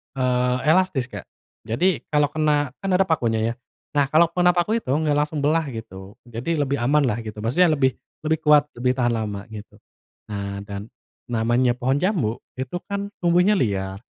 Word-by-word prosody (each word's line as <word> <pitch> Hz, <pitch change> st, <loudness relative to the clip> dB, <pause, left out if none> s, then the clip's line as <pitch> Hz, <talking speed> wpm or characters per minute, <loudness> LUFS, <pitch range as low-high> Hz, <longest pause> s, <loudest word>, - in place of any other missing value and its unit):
eee, 125 Hz, -1 st, +1 dB
elastis, 160 Hz, -8 st, +1 dB
Kak. -, -, -8 dB, 0.4 s
Jadi 175 Hz, +11 st, +1 dB
kalau 150 Hz, -1 st, +1 dB
kena 150 Hz, -3 st, +1 dB
kan 195 Hz, -, -5 dB
ada 190 Hz, -, +4 dB
pakunya 115 Hz, -10 st, 0 dB
ya. -, -, -5 dB, 0.4 s
Nah 145 Hz, -1 st, +2 dB
kalau 160 Hz, +4 st, +4 dB
kena 180 Hz, +1 st, +3 dB
paku 210 Hz, +6 st, +1 dB
itu 135 Hz, -, -1 dB
nggak 155 Hz, 0 st, +1 dB
langsung 150 Hz, 0 st, -1 dB
belah 155 Hz, +2 st, +2 dB
gitu. 100 Hz, -5 st, -9 dB
Jadi 120 Hz, +8 st, -3 dB
lebih 140 Hz, -2 st, 0 dB
amanlah 125 Hz, -2 st, +2 dB
gitu. 110 Hz, -2 st, -7 dB
Maksudnya 145 Hz, +11 st, +3 dB
lebih 130 Hz, -2 st, +2 dB, 0.3 s
lebih 160 Hz, 0 st, +1 dB
kuat, 150 Hz, -1 st, +6 dB, 0.2 s
lebih 125 Hz, +1 st, +2 dB
tahan 120 Hz, -2 st, +1 dB
lama, 105 Hz, -3 st, -3 dB
gitu. 105 Hz, -1 st, -10 dB, 0.6 s
Nah 100 Hz, -1 st, -4 dB
dan 100 Hz, 0 st, -6 dB, 0.4 s
namanya 120 Hz, +2 st, +2 dB
pohon 130 Hz, +1 st, +1 dB
jambu 165 Hz, -, 0 dB, 0.2 s
itu 130 Hz, +6 st, -3 dB
kan 200 Hz, 0 st, -3 dB
tumbuhnya 180 Hz, +4 st, +4 dB
liar. 95 Hz, -, -1 dB
135 Hz, 170 wpm, -23 LUFS, 115-160 Hz, 0.6 s, kuat